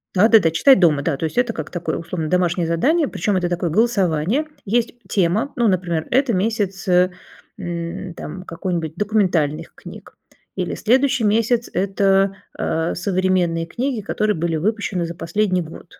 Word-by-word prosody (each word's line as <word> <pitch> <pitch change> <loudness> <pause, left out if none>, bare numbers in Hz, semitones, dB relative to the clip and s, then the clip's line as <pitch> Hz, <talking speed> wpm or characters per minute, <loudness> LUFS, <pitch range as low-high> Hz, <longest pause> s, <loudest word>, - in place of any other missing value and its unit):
Да-да-да, 205 -3 +5
читать 260 - +5
дома, 150 -5 +3
да, 145 -4 -1
то 160 - -2
есть 160 - -5
это 245 -2 +2
как 160 -1 -6
такое 175 -1 -3
условно 165 -2 -4
домашнее 175 -1 +1
задание, 285 - +2
причем 205 -4 -1
это 175 -1 0
такое 175 -1 -1
голосование. 200 - +1 0.2
Есть 235 +3 0
тема, 205 +8 0
ну, 235 -2 +2
например, 175 -4 0
это 260 -2 +2
месяц, 195 -1 -1
э, 180 0 +4 0.5
м, 170 0 -5
там 180 +5 -7
какой-нибудь 165 -3 -4
документальных 175 -7 0
книг - - -12 0.4
или - - -2
следующий 260 +1 +2
месяц- 230 +3 +1
это, 195 0 +2 0.2
э, 160 +1 -1
современные 180 -3 0
книги, 245 +2 -2
которые 210 +1 -1
были 165 0 -1
выпущены 195 0 -1
за 170 - -5
последний 185 +1 0
год, 165 +1 -11
185 Hz, 155 wpm, -20 LUFS, 170-215 Hz, 0.5 s, Да-да-да